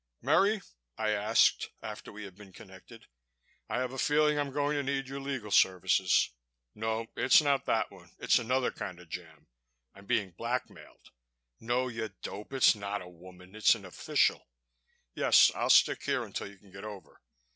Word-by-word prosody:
"Merry?" 205 +1 +3 0.4
I 110 -1 0
asked, 105 +2 +2
after - - -8
we 105 +1 -9
had 100 -2 -9
been 100 -1 -14
connected. - - -14 0.6
"I - - -1
have 130 0 -3
a 135 - -6
feeling 150 +1 +2
I'm 145 -1 -1
going 145 +2 -1
to 145 - 0
need 135 -1 -2
your 135 +1 -6
legal 135 -6 -5
services.... 95 -3 +3 0.4
No, 110 +1 -2
it's 130 - +5
not 140 -2 +1
that - - 0
one... - - -16
it's - - +3
another 125 +2 0
kind 90 -2 -7
of 90 -2 -16
jam... 80 -3 -9 0.5
I'm 100 0 -16
being 100 -2 0
blackmailed.... 115 +8 -6 0.5
No, 125 +2 -1
you 115 -2 -4
dope, 105 +5 -7
it's 135 -2 +5
not 100 -2 -5
a - - -12
woman, 90 +1 -15
it's 110 +1 +4
an 100 -4 -11
official.... 90 - 0 0.7
Yes, - - +5
I'll - - -2
stick - - +5
here - - -1
until - - -6
you 100 0 -14
can 95 0 -21
get 95 - -10
over.... 105 -3 -10
110 Hz, 175 wpm, -30 LUFS, 95-135 Hz, 0.7 s, it's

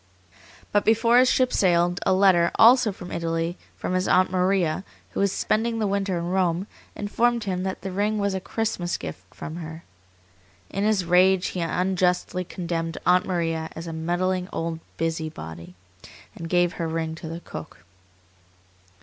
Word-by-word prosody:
But 205 - +3
before 230 +2 +4
his 255 0 +5
ship 255 -1 +2
sailed, 175 -1 +3
a - - +4
letter, 185 -3 +5
also 235 -1 +6
from 180 -2 -10
Italy, 165 +1 -2 0.2
from - - -3
his 185 0 +1
aunt 185 0 +4
Maria, 185 -2 +1 0.3
who - - -4
was 200 -1 +2
spending 225 +3 0
the 220 - 0
winter 195 -2 0
in 170 +1 -3
Rome, 185 -1 +1 0.3
informed 235 +3 +1
him 185 -3 -2
that 190 0 -3
the 195 - -5
ring 205 +3 0
was 200 -1 0
a 190 - -1
Christmas 200 -5 -2
gift 90 +3 -8
from 155 +3 -7
her. 160 -1 -8 0.9
In 195 - -2
his 210 -4 +2
rage 180 +2 +4
he 185 - -5
unjustly 180 +1 0
condemned 170 -2 -4
Aunt 180 +1 +4
Maria 165 -3 -1
as 165 - -6
a 165 - -5
meddling 180 +3 -1
old 165 0 -3 0.2
busybody, 155 - -4 0.6
and 165 - -7
gave 175 0 +2
her 165 - -3
ring 160 0 -2
to 160 0 -8
the 165 +1 -6
cook. 80 - -10
180 Hz, 165 wpm, -25 LUFS, 165-195 Hz, 0.9 s, also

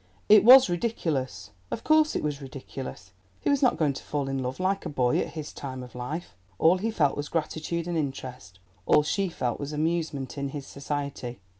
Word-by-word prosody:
It 215 0 +8
was 255 +3 +10
ridiculous—of 130 - -3
course 310 0 +4
it - - -1
was 150 -1 -2
ridiculous; 130 -7 -8 0.3
he - - +1
was 280 - +2
not 255 - +3
going 150 -4 +2
to - - -8
fall 145 -2 -2
in 135 -1 -2
love 125 +4 -4
like 190 +1 0
a - - -4
boy 125 -4 +1
at - - -3
his 155 -2 -6
time 130 -2 -6
of 125 - -12
life; 145 +8 -5 0.2
all 170 - +4
he 220 +4 -1
felt 150 -11 +2
was 145 0 -4
gratitude 165 +1 -2
and 175 - -2
interest—all 125 - -2
she 195 +5 0
felt 125 -7 -2
was 145 +1 -5
amusement 155 -3 -2
in 140 0 -2
his 140 -1 -6
society. 140 -4 -5
145 Hz, 190 wpm, -27 LUFS, 130-170 Hz, 0.3 s, was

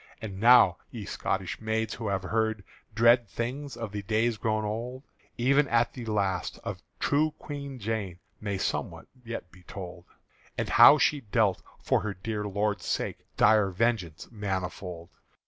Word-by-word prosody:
And 100 -4 -7
now, 115 -6 +7
ye 110 -4 -7
Scotish 95 +1 -3
maids 110 0 -1
who 115 -3 -5
have 95 -1 -1
heard 110 +1 0 0.3
Dread 115 +1 +5
things 130 +4 -4
of 115 -3 -5
the 105 0 -4
days 110 +3 +1
grown 110 0 -1
old 120 +5 -4 0.3
Even 140 +4 +3
at 120 -1 +2
the 125 -3 -7
last, 100 -4 -1
of - - -5 0.2
true 150 +2 +1
Queen 140 -2 -7
Jane 105 -5 -3 0.2
May 100 -2 -3
somewhat - - -3 0.2
yet 115 -6 -6
be 90 - -17
told, 90 -1 -9 0.5
And - - -2
how 120 +5 +9
she 145 0 +2
dealt 105 -4 +1 0.2
for - - +1
her 105 -3 -4
dear 105 +3 -4
Lord's 100 -1 -1
sake - - -2 0.2
Dire 105 -3 +5
vengeance 95 -5 -1
manifold. 90 -4 -4
110 Hz, 155 wpm, -28 LUFS, 95-120 Hz, 0.5 s, how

